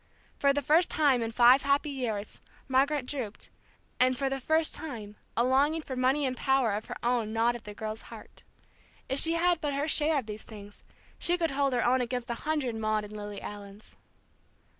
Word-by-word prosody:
For 280 - +4
the 285 +1 -1
first 320 +6 +4
time 280 -5 +3
in 225 0 -2
five 245 +3 +6
happy 280 +2 +1
years, 225 -6 -4 0.3
Margaret 270 +1 +2
drooped, 250 -6 -5 0.5
and 255 0 +3
for 270 0 -1
the 270 - -2
first 315 +4 +1
time 220 -9 -6 0.2
a 235 - +4
longing 285 +5 +2
for 265 - -6
money 260 +3 +2
and 255 -1 -1
power 265 -3 +2
of 210 +2 -3
her - - -6
own 235 -3 0
gnawed 230 +2 +2
at 240 - -10
the 210 -1 -8
girl's 215 0 -5
heart. - - -12 0.7
If 270 - 0
she 330 - +4
had 345 0 +2
but 290 -2 -1
her 285 +2 -1
share 310 0 +3
of 265 - -2
these 215 0 -7
things, 205 -2 -12 0.4
she 350 +1 +1
could 330 -3 0
hold 275 -1 +1
her 245 - +1
own 255 +1 +3
against 245 0 -3
a 235 +6 -5
hundred 290 -6 0
Maude 215 -1 -1
and 210 0 -9
Lily 205 -1 -7
Allens. 205 0 -9
255 Hz, 205 wpm, -29 LUFS, 225-285 Hz, 0.7 s, five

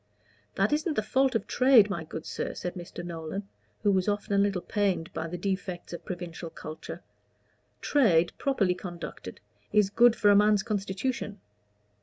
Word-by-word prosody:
"That - - +2
isn't 310 +1 0
the 215 - +1
fault 265 +3 +2
of 225 - 0
trade, 250 -5 +5
my 170 -4 -3
good 160 0 -7
sir," - - -4
said 180 - -4
Mr. 175 0 -8
Nolan, 170 +4 -5 0.4
who 205 - +4
was 190 0 +1
often 205 0 -1
a - - +3
little 200 -3 +1
pained 195 -6 -1
by 160 - -3
the 180 +2 -5
defects 185 -1 -4
of 170 - -7
provincial 175 -2 -6
culture. 155 0 -8 0.8
"Trade, 175 - +3
properly 210 -10 +2
conducted, 180 -1 -8 0.3
is 210 -2 +3
good 235 +1 +5
for 205 -2 +4
a - - +6
man's 210 -1 +4
constitution. 205 +1 -3
200 Hz, 165 wpm, -28 LUFS, 175-215 Hz, 0.8 s, a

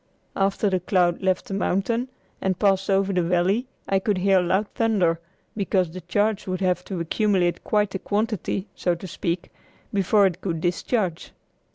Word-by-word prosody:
After 195 +2 +1
the 190 -2 +1
cloud 180 -1 +1
left 185 +1 +1
the 215 - -6
mountain 200 +6 0 0.3
and 190 -1 0
passed 195 -2 +2
over 195 0 +2
the 180 - +2
valley 180 +8 +1 0.2
I 195 - +2
could 200 0 0
hear 190 +1 +4
loud 190 +4 +1
thunder, 190 -8 +2 0.4
because 190 -4 0
the 185 +2 -7
charge 205 +4 0
would 185 -1 -2
have 180 -1 +1
to 190 -3 -4
accumulate 180 0 +1
quite 210 -2 +1
a 190 - -2
quantity, 210 -2 -1
so 175 -1 0
to 170 - -9
speak, 175 -1 -3 0.4
before 200 +1 +4
it 185 -1 -1
could 170 -4 -2
discharge. 175 +1 -1
190 Hz, 170 wpm, -24 LUFS, 180-205 Hz, 0.4 s, hear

